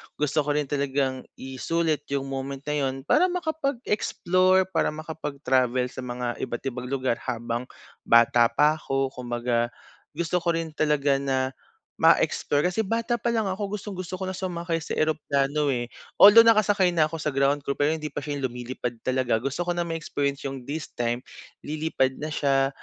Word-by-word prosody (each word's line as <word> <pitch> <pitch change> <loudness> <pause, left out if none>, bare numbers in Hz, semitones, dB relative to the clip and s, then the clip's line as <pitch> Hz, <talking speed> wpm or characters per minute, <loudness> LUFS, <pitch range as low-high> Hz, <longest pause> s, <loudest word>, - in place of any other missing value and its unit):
gusto 150 +1 0
ko 145 0 0
rin 150 - +2
talagang 135 -2 -1
isulit 150 +3 -2
yung 140 -1 -1
moment 135 0 -5
na 150 -2 0
yun 135 0 -5
para 315 - +4
makapag-explore, 235 - +1
para - - +1
makapag-travel 140 -5 -1
sa 130 - -9
mga 125 -1 -4
iba't 120 - -4
ibang 125 +1 -6
lugar 130 -3 -1
habang 120 0 -3 0.4
bata 115 0 +6
pa 150 +6 +2
'ko. 135 -2 -1
Kumbaga 120 -1 -1 0.5
gusto 170 +2 0
ko 170 -1 0
rin 165 -1 -3
talaga 145 -3 +1
na 130 -1 0 0.5
ma-explore, 145 - +3
kasi 220 +4 -1
bata 230 +3 0
palang 225 -3 0
ako 195 +1 -3
gustong 205 -2 -5
gusto 185 +1 -6
ko 185 - -2
na 190 - -4
sumakay 175 -2 -2
sa 160 - -5
eroplano, 150 -1 0
eh. 120 -1 -3 0.3
Although, 220 +3 +10
nakasakay 205 -5 +4
na 155 -2 +3
ako 165 - -5
sa 150 -2 -2
ground 140 +1 +1
crew 140 - 0
pero 145 +1 +1
hindi 155 -1 -4
pa 145 - -3
siya 145 -1 -4
lumilipad 125 -2 -4
talaga. 130 -3 0
Gusto 140 +7 -2
ko 175 - 0
na 175 - -1
ma-experience 145 -4 -2
yung 135 -1 -4
this 150 +1 -5
time, 120 +1 -2 0.4
lilipad 150 -4 0
na 155 - -3
siya. 135 -2 +2
145 Hz, 170 wpm, -25 LUFS, 130-170 Hz, 0.5 s, Although